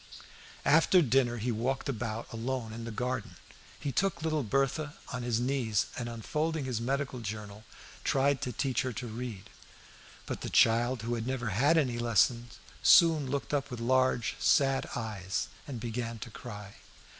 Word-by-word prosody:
After 165 +4 +5
dinner 120 -2 +2
he 120 +2 -1
walked 125 +4 -1
about 115 -3 -4
alone 115 -1 -3
in 115 0 -6
the 115 - -5
garden; 125 0 -3 0.4
he 145 - -2
took 170 +4 0
little 155 -2 +1
Berthe 135 +4 0 0.2
on 125 - -3
his 120 -2 0
knees, 120 -4 +1
and 120 -1 -4
unfolding 150 +6 -2
his 125 -3 -2
medical 135 +1 -1
journal, 105 -1 -6 0.4
tried 140 0 +2
to 125 - -2
teach 130 +2 0
her 130 -1 -3
to 125 - -5
read. 110 -4 -6 0.7
But - - -5
the - - -4
child, 120 +1 +3
who 115 0 -1
never 125 -1 -2
had 140 - +3
any 125 -6 +1
lessons, 120 +1 +2 0.2
soon 160 -5 +6
looked 140 +2 -3
up 145 -2 0
with 125 - -6
large, 130 0 +2
sad 135 -1 +3
eyes 105 -4 -3 0.2
and 130 -5 -5
began 115 0 -4
to 115 +1 -8
cry. 105 -4 -9
120 Hz, 160 wpm, -30 LUFS, 115-135 Hz, 0.7 s, soon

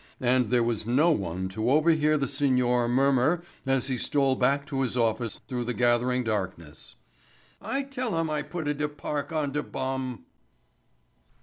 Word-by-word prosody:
And 125 -2 +2
there 120 0 +3
was 115 -2 -2
no 145 +8 +4
one 95 - -2
to 110 +5 -2
overhear 155 +1 +3
the 140 -1 -1
signor 125 -3 +1
murmur 135 +6 +2 0.2
as 135 -2 +1
he 130 -3 -2
stole 135 +1 +1
back 140 +3 +1
to 135 -2 -2
his 125 -1 -1
office 115 -1 0
through 125 -2 -2
the 125 0 -2
gathering 120 +1 +2
darkness. 95 -8 -5 0.7
"I 275 +1 -2
tella 255 -8 -3
dem 160 - -2
I 150 -1 0
putta 150 0 -3
de 150 +1 -2
park 145 +1 -4
on 155 -3 -1
de 150 +1 -1
bum." 130 -3 -4
130 Hz, 165 wpm, -27 LUFS, 120-150 Hz, 0.7 s, no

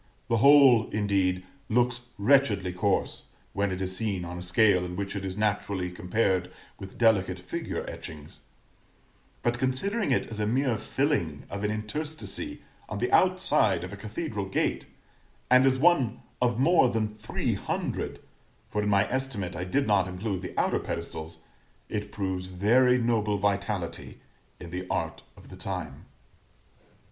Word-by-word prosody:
The 115 - +3
whole, 135 -2 +7
indeed, 95 -3 +1 0.3
looks 120 +1 +2 0.2
wretchedly 105 -5 +3
coarse, 95 +2 0 0.3
when 100 0 0
it 95 +1 -3
is 95 0 -1
seen 100 -3 -1
on 90 +1 -6
a - - -6
scale 90 +1 +3
in 90 0 -5
which 100 +1 -4
it 100 - -3
is 95 0 -4
naturally 100 -3 -1
compared 90 0 0 0.3
with 95 -2 -9
delicate 100 -6 +3
figure 90 0 -5
etchings; 75 -2 -9 1.0
but 120 0 0
considering 195 - 0
it - - +2
as 110 -2 -7
a 105 - 0
mere 125 -1 +1
filling 110 - -1
of 100 +1 -4
an 105 - +1
interstice 150 - -4 0.3
on - - -4
the 375 - -1
outside 180 - +3
of 95 - -7
a - - -4
cathedral 105 - -4
gate, 95 - -1 0.6
and 125 +1 +7
as 130 0 +3
one 140 -6 +3 0.2
of 120 -1 +2
more 160 -1 +5
than 110 -2 0
three 105 +1 -3
hundred - - -3 0.5
(for 105 - -1
in 105 - 0
my 100 0 +3
estimate 120 -9 -2
I 90 +1 -3
did 135 +10 +1
not 100 -3 +3
include 95 +1 -3
the 90 - -8
outer - - +2
pedestals), 80 +1 -6 0.5
it 105 -1 -4
proves 95 -3 -3
very 120 +8 +4
noble 110 -4 +1
vitality 100 -4 -2 0.4
in 85 - -9
the 90 +1 -5
art - - -2 0.2
of - - -15
the - - -10
time. 90 -7 -6
105 Hz, 155 wpm, -28 LUFS, 95-120 Hz, 1.0 s, whole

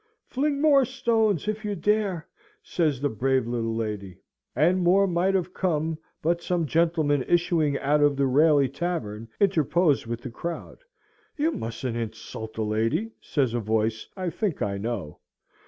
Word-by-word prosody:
"Fling 280 +2 -1
more 285 -2 +5
stones, 225 - +1
if 215 +1 -2
you 205 -1 -2
dare!" 195 -2 0 0.4
says 155 - 0
the 145 - +1
brave 130 +2 +1
little 115 -1 -2
lady; 105 -5 -4 0.4
and 170 +8 +3
more 185 +3 +4
might 185 +1 +1
have 185 -1 -1
come, 160 -3 -1 0.2
but 170 +2 +1
some 175 -2 0
gentlemen 155 -3 +2
issuing 165 -4 +2
out 145 +2 +1
of 145 -1 +4
the 140 0 +1
Raley 145 +1 +4
Tavern 130 -9 -4
interpose 170 - +2
with 120 0 -4
the 125 - -7
crowd. 170 +7 -6 0.6
"You 310 +3 +2
mustn't 115 - -4
insult 110 -1 -6
a 110 - 0
lady," 115 - 0
says 130 -6 0
a 120 - 0
voice 110 0 -1
I 185 -2 -2
think 200 -5 -2
I 100 -1 -2
know. 105 -8 -4
155 Hz, 155 wpm, -26 LUFS, 115-185 Hz, 0.6 s, more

